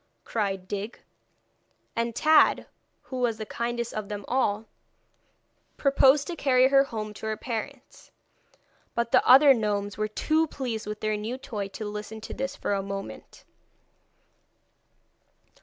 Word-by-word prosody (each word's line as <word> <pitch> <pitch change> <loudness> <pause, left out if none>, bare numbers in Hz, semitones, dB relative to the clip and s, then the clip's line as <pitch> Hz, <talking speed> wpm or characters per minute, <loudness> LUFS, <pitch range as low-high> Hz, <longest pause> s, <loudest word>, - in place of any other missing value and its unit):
cried 195 -4 -2
Dig. 205 +4 -5 1.0
And 230 0 -1
Tad, 310 0 +4 0.4
who 260 - -7
was 235 -3 0
the 215 - -5
kindest 235 +1 -3
of 215 -1 -5
them 205 -1 -5
all, 225 -4 0 1.1
proposed 275 0 +4
to 345 - -5
carry 260 -4 +4
her 275 0 +5
home 215 -5 -5
to 220 - -7
her 215 0 -2
parents. 250 +4 -7 0.9
But 235 0 -1
the - - +5
other 275 +2 +9
gnomes 205 -3 -2
were 215 - +1
too 315 +9 +1
pleased 240 -7 -4
with 210 0 -5
their 215 0 0
new 220 +5 -4
toy 210 -6 -5
to 215 +2 -7
listen 210 +1 -6
to - - -7
this 270 0 -4
for - - -2
a 195 - 0
moment. 195 0 -8
225 Hz, 140 wpm, -27 LUFS, 210-260 Hz, 1.1 s, other